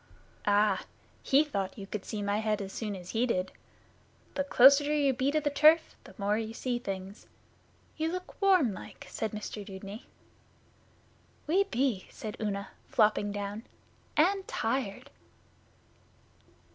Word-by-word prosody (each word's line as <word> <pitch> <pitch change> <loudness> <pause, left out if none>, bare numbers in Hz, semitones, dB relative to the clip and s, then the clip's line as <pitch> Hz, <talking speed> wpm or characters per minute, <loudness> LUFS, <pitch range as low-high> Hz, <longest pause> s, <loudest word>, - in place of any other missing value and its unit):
'Ah, 205 -1 +3 0.4
he 280 +2 +4
thought 200 -11 -3
you 200 - -6
could 200 0 -5
see 210 -2 -4
my 200 +1 0
head 215 -1 0
as 195 -1 -6
soon 210 -3 -3
as 180 -1 -8
he 235 +3 +1
did. 185 -5 -1 0.8
The 280 - 0
closeter 280 +2 +6
you 280 -2 +3
be 260 +2 0
to 310 +2 +2
the 290 -1 -1
turf 310 +3 +5
the 190 - -14
more 205 +2 +1
you 225 0 -5
see 245 -1 -2
things. 195 -2 -6 0.7
You 320 +1 0
look 365 +3 -7
warm 365 - +4
like,' - - -10
said 220 - -2
Mr 210 0 -6
Dudeney. 200 +2 -9 1.4
'We 375 +6 +3
be,' 245 - -1
said 215 -1 -7
Una, 200 -2 -2 0.2
flopping 215 -4 +2
down. 205 +1 -4 0.6
'And 380 +5 +3
tired. 225 -3 -2
220 Hz, 145 wpm, -30 LUFS, 200-280 Hz, 1.4 s, closeter